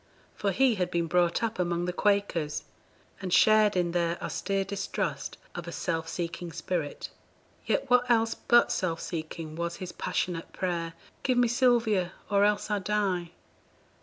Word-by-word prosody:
For 205 - -1
he 255 +6 +4
had 180 -4 -1
been 170 -1 0
brought 175 +4 +2
up 225 -3 -2
among 175 -1 0
the 180 - -2
Quakers, 185 -7 0 0.6
and 185 -2 -4
shared 215 +1 +5
in 175 -1 +1
their 170 0 0
austere 195 0 -1
distrust 200 0 -3 0.2
of 175 -1 -6
a - - -4
self 165 -2 -2
seeking 170 0 -4
spirit; 160 -4 -3 0.6
yet - - +1
what 250 0 +4
else 225 -1 +3
but 240 0 +4
self 170 -3 -1
seeking 160 -1 -5
was 170 +1 -3
his 185 -1 -6
passionate 170 -2 -2
prayer, 170 -3 -2 0.3
'Give 255 -2 +1
me 245 -1 +5
Sylvia, 230 -7 +2 0.2
or 200 0 +4
else, 210 +1 +1
I 205 - +1
die?' 195 -4 0
185 Hz, 160 wpm, -28 LUFS, 170-210 Hz, 0.6 s, shared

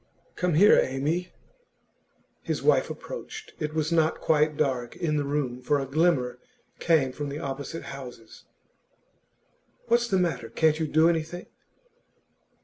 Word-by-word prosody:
'Come 180 -3 0
here, 200 +6 +7
Amy.' 150 +7 -2 1.1
His - - -3
wife - - +3
approached. 435 -3 -8
It 155 0 -3
was 155 +1 0
not 160 -1 +2
quite 150 -1 +2
dark 130 -5 -1
in 160 -4 -1
the 145 - 0
room, 140 -3 -2
for 145 +3 +1
a 135 - -2
glimmer 135 -3 +1 0.4
came 155 -6 +2
from 145 +2 -5
the 140 - -5
opposite 140 +3 -5
houses. 125 -5 -10 1.4
'What's 235 0 +3
the 195 - +1
matter? 135 -11 -1
Can't 155 +5 +2
you 160 - 0
do 155 +2 +4
anything? 170 +1 -1
150 Hz, 140 wpm, -26 LUFS, 135-165 Hz, 1.4 s, here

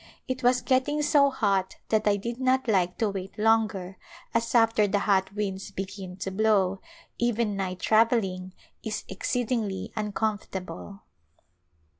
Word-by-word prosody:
It 260 0 -3
was 245 0 +3
getting 265 +4 +1
so 285 -1 +5
hot 195 -7 0
that 215 -1 +2
I 205 - +4
did 235 +4 -5
not 260 0 +2
like 185 -4 +1
to 220 -3 +1
wait 195 -1 -7
longer 215 -4 +1 0.4
as 230 0 0
after 225 -2 +4
the 205 - +1
hot 195 -2 +1
winds 195 -2 -3
begin 190 -1 -6
to 195 - -2
blow 195 -2 +2 0.4
even 235 -3 +1
night 185 -2 -3
travelling 205 -5 +2 0.3
is 215 -1 -3
exceedingly 220 0 -2
uncomfort 210 -1 -2
able. 100 - -7
210 Hz, 140 wpm, -27 LUFS, 190-230 Hz, 0.4 s, so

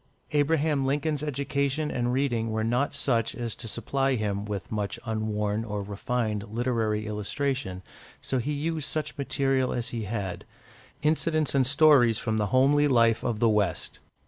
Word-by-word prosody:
Abraham 150 -1 +2
Lincoln's 145 +2 0
education 140 +1 -1
and 120 0 0
reading 125 -4 0
were 110 0 -1
not 125 +6 0
such 120 -5 0
as 120 -3 -3
to 115 - -8
supply 135 +5 0
him 105 -3 -2
with 105 -2 -5
much 105 -2 -2
unworn 110 -1 -1
or 105 -2 -4
refined 105 +1 -2
literary 110 -3 0
illustration, 105 -1 -2 0.4
so 130 - -1
he 135 +5 -2
used 155 +1 -2
such 155 -1 -2
material 135 -2 0
as 120 -1 -2
he 115 -3 -4
had 95 -4 -4 0.6
incidents 155 0 +1
and 135 -2 +3
stories 140 -6 +5
from 110 -1 -1
the 105 - +1
homely 140 +6 +4
life 115 -4 +3
of 115 -3 -1
the 115 - +3
West. 105 -2 0
120 Hz, 155 wpm, -27 LUFS, 110-140 Hz, 0.6 s, stories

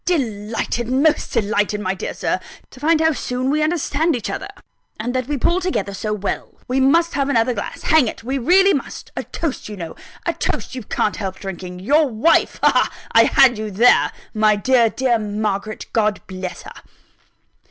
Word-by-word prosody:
"Delighted 230 - -2
most 275 +5 +2
delighted, 210 -2 0
my 190 -2 -1
dear 190 - -5
Sir, - - -1 0.3
to 255 - -14
find 315 +3 +3
how 320 0 +4
soon 255 -2 -2
we 305 +1 +1
understand 315 0 +1
each 235 - -4
other, - - -4 0.5
and 240 +3 -2
that 255 -1 -1
we 295 -1 -1
pull 345 +8 +1
together 355 - -2
so 210 +2 -3
well. 205 -1 -4
We 255 +2 0
must 330 +6 +3
have 275 -1 0
another 245 -2 +2
glass; 205 - -6
hang 315 -6 +4
it, 220 - -6
we 265 +3 -2
really 380 +9 +5
must! 275 - -5
a - - -2
toast, 300 -9 -4
you 210 - -7
know; 165 -3 -7 0.3
a - - 0
toast - - -3
you 255 - -5
can't 210 0 -1
help 190 -3 -4
drinking 180 -2 -7
your 290 +8 +3
wife! 235 +8 +2
Ha! - - +6
ha! - - +2 0.2
I - - +6
had 260 -6 +5
you 215 0 -3
there! 225 +5 +4 0.2
my 215 -1 +3
dear, 235 +2 +3
dear 245 -1 +1
Margaret, 210 0 -3
God 215 -2 +1
bless 185 -1 -6
her!" - - -10
240 Hz, 190 wpm, -20 LUFS, 210-285 Hz, 0.5 s, Ha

